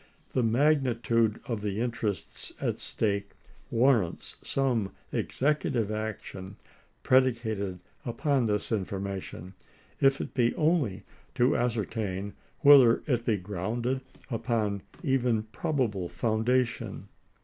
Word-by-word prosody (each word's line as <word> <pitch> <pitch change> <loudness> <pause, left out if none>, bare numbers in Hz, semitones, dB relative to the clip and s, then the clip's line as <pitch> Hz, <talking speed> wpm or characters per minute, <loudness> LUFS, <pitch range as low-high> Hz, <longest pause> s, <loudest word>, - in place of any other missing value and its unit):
The 130 - +1
magnitude 115 -3 +2
of 115 -4 -2
the 105 0 -2
interests 115 -4 -3
at - - -1
stake 100 -2 -1 0.4
warrants 115 -7 +2
some 120 -8 0 0.2
executive 130 -6 0
action 105 -3 -5 0.5
predicated 115 -8 +2 0.2
upon 130 +1 +1
this 105 +1 -1
information, 95 -3 -4 0.5
if 135 0 +4
it - - -5
be 120 -2 +2
only 150 - +1 0.3
to 125 +2 +3
ascertain 105 -4 -2 0.3
whether 140 -6 +7
it 120 -5 0
be 110 -3 +2
grounded 110 +7 -2 0.3
upon 115 -4 0 0.2
even 125 -6 +2
prob 130 +7 -3
able 100 -7 -1
foundation. 120 +2 0
115 Hz, 105 wpm, -29 LUFS, 100-130 Hz, 0.5 s, whether